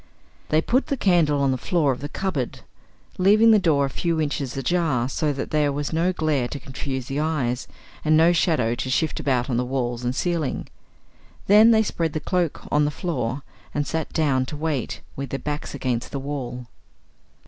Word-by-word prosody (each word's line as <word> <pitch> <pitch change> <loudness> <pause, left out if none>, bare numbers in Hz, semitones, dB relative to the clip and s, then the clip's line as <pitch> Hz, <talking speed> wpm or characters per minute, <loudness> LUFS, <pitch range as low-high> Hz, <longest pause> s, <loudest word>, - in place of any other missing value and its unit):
They 155 +1 +3
put 255 +3 +1
the 275 - -1
candle 170 - +3
on 135 - +3
the 130 - -1
floor 155 -1 +1
of 125 - -3
the 145 - -4
cupboard, 155 -9 -3 0.6
leaving 215 +4 +6
the 215 - +6
door 150 -6 +3
a - - -3
few 165 +2 -1
inches 140 -3 -2
ajar, 135 -4 +1
so 150 +3 0
that 140 -1 -5
there 150 -2 +2
was 145 +2 -3
no 170 +3 +2
glare 155 -7 0
to 140 - -6
confuse 130 0 -5
the 135 +3 -3
eyes, 140 -6 -1 0.4
and 155 0 +4
no 165 +2 +5
shadow 155 -9 +2
to 130 - -3
shift 155 +4 0
about 125 -3 0
on 125 -1 -1
walls 125 -2 -2
and 125 +1 -1
ceiling. 170 -3 -1 0.8
Then 210 +3 +7
they 220 -1 +5
spread 165 -6 -2
the 155 - -1
cloak 175 -1 -1
on 150 0 +3
the - - +1
floor 135 -5 -3 0.3
and 145 0 0
sat 160 0 -3
down 135 -5 +1
to 150 - -6
wait, 150 -5 -2
with 140 0 -5
their 135 - -2
backs 150 0 -4
against 125 -4 -2
the 140 - -3
wall. 130 -3 -5
145 Hz, 190 wpm, -23 LUFS, 130-165 Hz, 0.8 s, Then